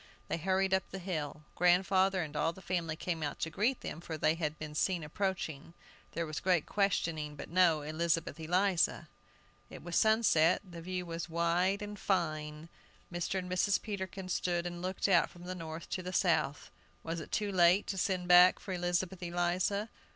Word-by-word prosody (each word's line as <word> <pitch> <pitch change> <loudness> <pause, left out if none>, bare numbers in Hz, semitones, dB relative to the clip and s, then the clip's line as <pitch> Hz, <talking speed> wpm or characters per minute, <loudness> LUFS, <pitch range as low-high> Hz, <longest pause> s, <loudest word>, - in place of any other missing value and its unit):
They - - 0
hurried 190 +3 +1
up 190 -1 +1
the 195 - -6
hill. 155 -5 -4
Grandfather 185 +1 +3
and 150 -1 -8
all 165 +2 +1
the 190 - -13
family 170 -3 -2
came 165 0 -3
out 145 -2 -3
to 165 - -1
greet 235 +9 0
them, 165 - -6
for 160 -2 -5
they 155 +1 +3
had 155 -2 -3
been 155 -1 -7
seen 175 +2 0
approaching. 165 -2 -3 0.4
There 170 - -2
was 155 -1 -4
great 180 -4 +2
questioning, 165 -7 0
but 145 - -9
no 170 -4 +4
Elizabeth 165 +2 -1
Eliza! 180 +3 +1 0.6
It - - -10
was 175 0 -4
sunset; 210 -7 +4
the 170 -2 -9
view 180 +1 -4
was 170 0 -5
wide 175 +4 +1
and 205 0 -7
fine. 155 -4 -1 0.5
Mr. 175 +2 -2
and 185 -1 -3
Mrs. 185 +2 +2
Peterkin 190 -3 -5
stood 175 -1 -1
and 175 0 -5
looked 185 +2 -1
out 180 -4 +4
from 175 - -14
the 180 +1 -5
north 165 -2 -7
to 185 - -2
the 185 +1 -6
south. 160 -6 +1 0.3
Was 165 +1 -3
it 155 - -9
too 210 -2 -1
late 180 +1 +4
to 195 - -4
send 180 -1 -1
back 180 +1 +8
for 190 - -6
Elizabeth 175 +1 -1
Eliza? 175 +4 0
175 Hz, 185 wpm, -32 LUFS, 165-190 Hz, 0.6 s, back